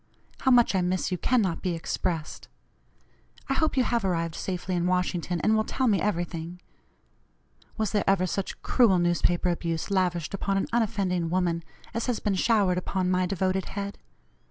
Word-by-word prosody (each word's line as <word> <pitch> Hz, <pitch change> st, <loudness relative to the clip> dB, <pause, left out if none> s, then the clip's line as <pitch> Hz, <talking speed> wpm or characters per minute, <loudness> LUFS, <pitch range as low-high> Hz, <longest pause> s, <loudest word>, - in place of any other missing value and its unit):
How 265 Hz, -, +1 dB
much 245 Hz, -4 st, +5 dB
I 190 Hz, -, +2 dB
miss 185 Hz, +1 st, -1 dB
you 180 Hz, -, 0 dB
cannot 210 Hz, -9 st, +1 dB
be 180 Hz, -3 st, -1 dB
expressed. 165 Hz, -1 st, -3 dB, 1.0 s
I -, -, +2 dB
hope 310 Hz, 0 st, 0 dB
you 260 Hz, -, +5 dB
have 235 Hz, -2 st, 0 dB
arrived 170 Hz, -3 st, -1 dB
safely 180 Hz, +1 st, -3 dB
in 175 Hz, 0 st, 0 dB
Washington, 180 Hz, -1 st, 0 dB
and 215 Hz, +5 st, +3 dB
will 220 Hz, -, +2 dB
tell 260 Hz, -, -1 dB
me 210 Hz, -6 st, +3 dB
everything. 175 Hz, -3 st, -3 dB, 1.2 s
Was 215 Hz, -2 st, 0 dB
there 210 Hz, -, +1 dB
ever 195 Hz, -2 st, +3 dB
such 190 Hz, +2 st, -4 dB
cruel 225 Hz, -7 st, +4 dB
newspaper 175 Hz, +1 st, +1 dB
abuse 170 Hz, +1 st, -2 dB
lavished 180 Hz, -4 st, 0 dB
upon 195 Hz, 0 st, -1 dB
an 195 Hz, -, +1 dB
unoffending 195 Hz, -7 st, 0 dB
woman 170 Hz, -1 st, 0 dB, 0.3 s
as 230 Hz, +2 st, -2 dB
has 245 Hz, -3 st, 0 dB
been 205 Hz, -, 0 dB
showered 190 Hz, -2 st, +2 dB
upon 185 Hz, 0 st, -1 dB
my 185 Hz, 0 st, +2 dB
devoted 190 Hz, 0 st, 0 dB
head? 200 Hz, 0 st, -5 dB
185 Hz, 170 wpm, -27 LUFS, 175-205 Hz, 1.2 s, much